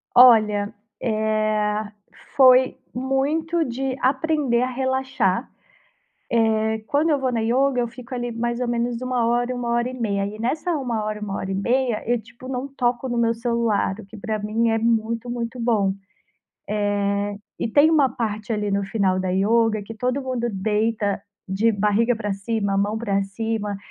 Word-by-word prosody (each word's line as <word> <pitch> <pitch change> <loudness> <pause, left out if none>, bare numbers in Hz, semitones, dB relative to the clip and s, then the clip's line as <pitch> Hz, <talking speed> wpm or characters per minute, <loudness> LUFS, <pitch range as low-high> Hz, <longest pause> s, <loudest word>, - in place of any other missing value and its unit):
Olha, 215 -4 +6 0.3
eh, 215 -1 0 0.5
foi 255 -1 +6 0.2
muito 295 +6 0
de 265 0 -3
aprender 270 -2 +1
a 255 - 0
relaxar. 260 -4 0 0.8
Eh, 220 -1 +2
quando 305 +3 +2
eu 295 -2 +2
vou 260 -1 0
na 235 - 0
yoga 250 +4 +2
eu 240 - 0
fico 245 +2 -11
ali 240 -1 -3
mais 235 +1 -2
ou 250 - -1
menos 240 0 -1
1 255 -2 0
hora, 240 +2 +1
1 245 -1 -3
hora 240 +1 +1
e - - -7
meia. 200 -3 0
E 210 +1 -8
nessa 300 +10 -1
uma 300 - -1
1 230 -4 -1
hora, 210 0 -3
1 200 -2 -4
e 190 0 -2
meia, 240 +3 0
eu, 240 +1 +1
tipo, 235 +3 -13
não 260 +1 -3
toco 250 -1 -1
no 240 - -1
meu 230 -1 +2
celular, 230 -4 0
o 220 - -9
que 200 +3 -13
pra 215 +1 -3
mim 220 +3 0
é 225 - +2
muito, 230 +1 0
muito 240 0 -4
bom. 215 -5 +2 1.4
Eh, 205 - -7
e - - +1
tem 290 +7 +5
uma 295 -4 +5
parte 225 -3 -3
ali 210 -1 -1
no 200 0 +1
final 195 -2 +1
da 185 0 -1
yoga 215 +3 +2
que 225 +3 -8
todo 250 +4 -1
mundo 255 -3 -2
deita 210 0 0 0.3
de 200 +5 +2
barriga 210 +4 +2
pra 210 -2 -3
cima, 200 0 -1
mão 205 +2 0
pra 200 -3 0
cima, 210 0 -3
230 Hz, 175 wpm, -23 LUFS, 215-250 Hz, 1.4 s, Olha